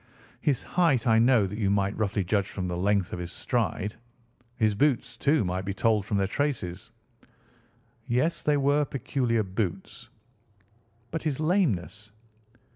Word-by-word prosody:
"His 140 -5 +1
height 165 -10 +2
I 110 -2 +4
know 120 -3 +4
that 105 +3 -5
you 100 -3 +1
might 100 0 +1
roughly 100 -2 0
judge 100 +1 0
from 95 -2 -4
the 90 - -3
length 100 +1 +1
of - - -4
his 90 -1 -5
stride. 105 +2 -2 0.6
His 110 -2 +2
boots, 125 0 +1
too, 140 0 +2
might 90 +1 -2
be 100 0 -4
told 110 -2 +1
from 105 - 0
their 100 - +2
traces." 105 -6 -3 1.2
"Yes, 130 +8 +1
they 150 -1 +2
were 145 +1 +3
peculiar 125 -5 -1
boots." 100 +5 -4 1.0
"But 165 - -3
his 150 -4 -2
lameness?" 115 - 0
110 Hz, 150 wpm, -27 LUFS, 100-135 Hz, 1.2 s, I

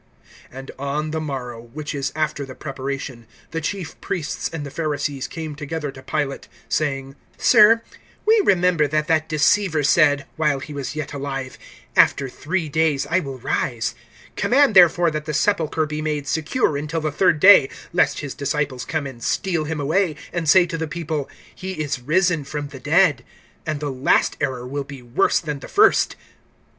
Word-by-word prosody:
(62)And 135 +1 -9
on 145 +3 -2
the 160 0 -2
morrow, 125 -6 -5
which 145 +7 -7
is 140 -2 -2
after 155 -2 -1
the 130 -1 -9
preparation, 135 -4 -6 0.2
the 165 - -3
chief 180 +1 -5
priests 165 -5 -3
and 160 -3 -5
the 140 - -8
Pharisees 145 -4 -2
came 160 -2 -6
together 150 0 -5
to 130 - -12
Pilate, 135 +1 -3 0.2
(63)saying: 135 -3 -1 0.2
Sir, 230 0 +6 0.4
we 440 0 +5
remember 180 - +3
that 155 +1 0
that 160 -1 +1
deceiver 155 +1 +2
said, 145 -2 +4
while 150 -3 +2
he 150 +3 -8
was 140 0 -5
yet 155 -2 -5
alive: 135 -2 -5 0.4
After 140 - +4
three 165 +5 -3
days 150 -2 +1
I 175 - +4
will 135 -6 -6
rise. 115 -2 -2 0.4
(64)Command, 275 -1 +3
therefore, 175 -2 +6
that 155 0 -4
the 155 -2 -3
sepulchre 160 -3 +1
be 150 0 -4
made 150 -2 -2
secure 160 - 0
until 155 +3 -3
the 155 0 -1
third 155 +1 +2
day 185 -7 +8 0.2
lest 175 - +2
his 145 -3 -5
disciples 140 -2 -2
come 155 -3 -2
and 130 -4 -8
steal 170 -5 0
him 155 0 -3
away, 160 +3 +1 0.2
and 170 -3 -1
say 185 +1 +7
to 165 -1 -5
the 160 - -2
people: 155 -3 -4 0.2
He 190 +1 -6
is 145 -6 -3
risen 165 +3 +2
from 145 +1 -5
the 135 - -10
dead; - - +3 0.4
and 155 -2 -2
the 145 -1 -3
last 130 +1 +2
error 125 -2 -2
will 140 +2 -3
be 140 -2 -11
worse 120 +11 +2
than 150 -3 -5
the - - -9
first. 415 - +4
150 Hz, 175 wpm, -22 LUFS, 140-165 Hz, 0.4 s, day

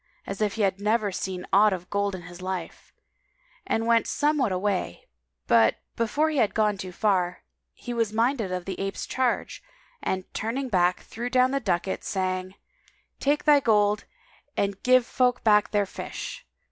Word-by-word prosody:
as 195 - -5
if 210 -2 +1
he 220 - 0
had 195 0 0
never 210 0 +1
seen 185 0 -4
aught 210 +2 +6
of 180 -2 -4
gold 200 -1 0
in 180 - -9
his 175 +1 -11
life; 185 -2 -5 0.8
and 225 - 0
went 230 -1 +3
somewhat 290 -6 +1
away, 185 - -2 0.4
but, 115 - +4 0.2
before 285 +8 +1
he 305 - -2
had 215 -6 +2
gone 210 -2 +2
far, 185 -1 -1 0.3
he 245 - -7
was 230 -3 0
minded 225 -2 0
of 180 -1 -3
the 195 - -5
ape's 195 0 -3
charge 255 -2 -1 0.4
and 185 0 -1
turning 255 +4 -2
back 180 -3 +2
threw 240 +3 -5
down 255 0 +3
the 275 - +1
ducat, 190 -4 -1
saying, 185 0 -2 0.6
"Take 290 +2 +1
thy 295 -2 +6
gold 210 -4 +2 0.5
and 200 -1 -1
give 255 -1 +4
folk 250 -1 +1
back 210 -2 +4
their 205 -1 +1
fish! - - -7
205 Hz, 165 wpm, -26 LUFS, 185-235 Hz, 0.8 s, aught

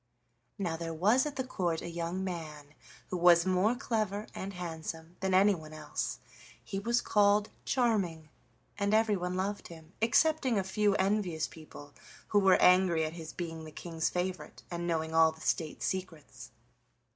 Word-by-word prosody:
Now 170 -5 -2
there 165 -1 -5
was 215 - +3
at 290 - -6
the 260 - -1
Court 175 -10 -2
a - - -5
young 170 +2 -3
man, 155 -5 -6 0.4
who 180 - -2
was 170 0 +6
more 190 +5 +2
clever 215 -5 -2
and 195 +1 -5
handsome 165 -1 -6
than 190 -1 +1
anyone 185 -6 +3
else. 155 0 -4 0.5
He 195 - -4
was 235 +4 +1
called 205 0 +3 0.2
Charming, 195 - 0 0.5
and 200 +1 +2
everyone 200 -5 +1
loved 200 +2 -3
him, 165 0 -13
excepting 260 +1 +3
a 195 - +1
few 205 +1 +1
envious 190 -5 0
people 145 -2 -13 0.4
who 205 - +4
were 190 -2 +5
angry 180 -3 +5
at 155 - -5
his 160 -2 -8
being 165 -2 -6
the 155 - -9
King's 165 0 -3
favorite 180 +1 -4
and 175 0 -3
knowing 160 -1 -1
all 160 0 +5
the 160 - -16
State 155 0 -2
secrets. 180 -5 -5
180 Hz, 160 wpm, -31 LUFS, 160-205 Hz, 0.5 s, was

